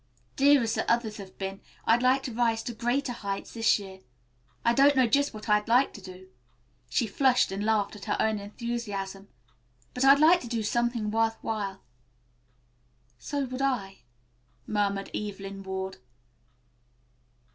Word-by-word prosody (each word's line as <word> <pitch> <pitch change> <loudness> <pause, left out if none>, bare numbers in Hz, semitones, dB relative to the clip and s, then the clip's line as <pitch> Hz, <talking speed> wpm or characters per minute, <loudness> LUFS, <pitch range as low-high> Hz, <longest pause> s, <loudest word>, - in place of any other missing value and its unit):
Dear 280 -1 +5
as 225 0 -1
the - - 0
others 230 -2 0
have 195 -2 -11
been, 195 0 -5 0.2
I'd 230 +2 +4
like 260 +2 +3
to 250 - -5
rise 225 -1 +1
to 240 - -5
greater 245 +4 -1
heights 200 -3 -5
this 225 -1 +3
year. 190 -2 -10 0.7
I 235 - +4
don't 280 +3 +5
know 260 -1 +5
just 285 +5 +2
what 215 +1 -10
I'd 210 -1 +2
like 245 +4 +3
to 205 - -10
do," 185 0 -12 0.6
she 235 - +1
flushed 250 +3 +2
and 195 +1 -3
laughed 215 -1 +1
at 200 -2 -10
her - - -1
own 220 -1 +1
enthusiasm, 200 -2 -5 0.7
"but 250 - -1
I'd 275 +1 +8
like 330 +4 +5
to 240 - -7
do 230 -2 -2
something 235 -1 0
worth 225 0 +1
while." 200 -3 -3 1.4
"So 285 - -2
would 255 +1 -5
I," 210 -8 -1 0.7
murmured 200 -2 -1
Evelyn 195 -1 -5
Ward. 190 0 -5
225 Hz, 155 wpm, -28 LUFS, 200-245 Hz, 1.4 s, I'd